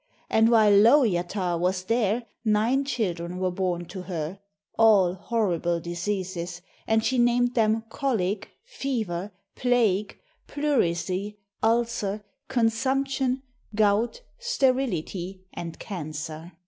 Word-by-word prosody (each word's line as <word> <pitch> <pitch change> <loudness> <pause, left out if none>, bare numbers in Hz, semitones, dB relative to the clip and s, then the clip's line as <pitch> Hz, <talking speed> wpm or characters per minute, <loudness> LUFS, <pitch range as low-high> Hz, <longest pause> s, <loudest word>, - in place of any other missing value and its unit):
And 225 +1 +5
while 220 -3 +5
Lowjatar 200 - +3
was 185 +1 0
there, 230 +2 +1 0.2
nine 225 +5 +2
children 180 -9 -2
were 185 0 0
born 180 -1 -2
to 190 - -6
her, 175 0 -4 0.4
all 205 -6 +5
horrible 180 -4 0
diseases, 175 0 -4 0.2
and 220 0 +2
she 255 -1 +1
named 240 0 +3
them 225 -1 +2
Colic, 220 -6 -1 0.2
Fever, 220 - -3 0.2
Plague, 220 -5 +1 0.3
Pleurisy, 205 - 0 0.2
Ulcer, 225 -3 0 0.2
Consumption, 265 +2 0 0.3
Gout, 215 - +2 0.2
Sterility, 220 - -1
and 165 -1 -6
Cancer. 155 -1 -6
210 Hz, 100 wpm, -26 LUFS, 180-240 Hz, 0.4 s, And